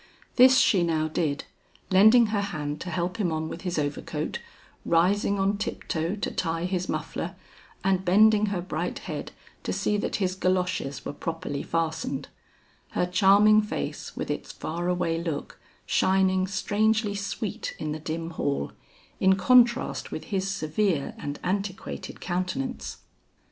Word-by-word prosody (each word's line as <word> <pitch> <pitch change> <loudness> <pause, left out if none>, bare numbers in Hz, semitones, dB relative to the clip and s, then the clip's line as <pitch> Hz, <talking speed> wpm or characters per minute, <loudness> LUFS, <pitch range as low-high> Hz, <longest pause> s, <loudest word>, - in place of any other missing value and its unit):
This 260 +1 +7
she 200 -7 +4
now 160 -2 +1
did, 155 -2 -1 0.5
lending 220 +5 +7
her 205 - +2
hand 150 -7 -4
to 180 - -5
help 175 +2 -2
him 190 -6 0
on 160 0 -2
with 170 - -7
his 180 -3 -3
overcoat, 145 -1 -2 0.4
rising 195 +4 +2
on 195 +1 +1
tip - - -4
toe 165 +4 -1
to 205 - -3
tie 165 0 -1
his 185 0 -2
muffler, - - -3 0.5
and 190 -1 +2
bending 210 +3 +5
her 195 -3 -1
bright 180 - -3
head - - -6 0.3
to - - -3
see 210 - 0
that - - -2
his 185 -3 0
galoshes 185 -6 -1
were - - -4
properly 165 -2 -4
fastened; 160 -4 -2 0.6
her - - +1
charming 200 +4 +5
face 210 - -5
with - - -2
its - - -4
far 170 +2 -4
away 170 -2 0
look, 160 -4 -4 0.3
shining 190 0 +2
strangely 210 +2 +1
sweet 200 +1 -4
in 155 - -3
the 155 - -4
dim 165 +2 -4
hall, 140 - -2 0.5
in 190 0 +5
contrast 245 +4 +3
with - - -5
his 190 0 0
severe 165 -3 0
and 145 0 -5
antiquated 195 +1 -3
countenance. 185 +9 -3
185 Hz, 150 wpm, -26 LUFS, 165-205 Hz, 0.6 s, This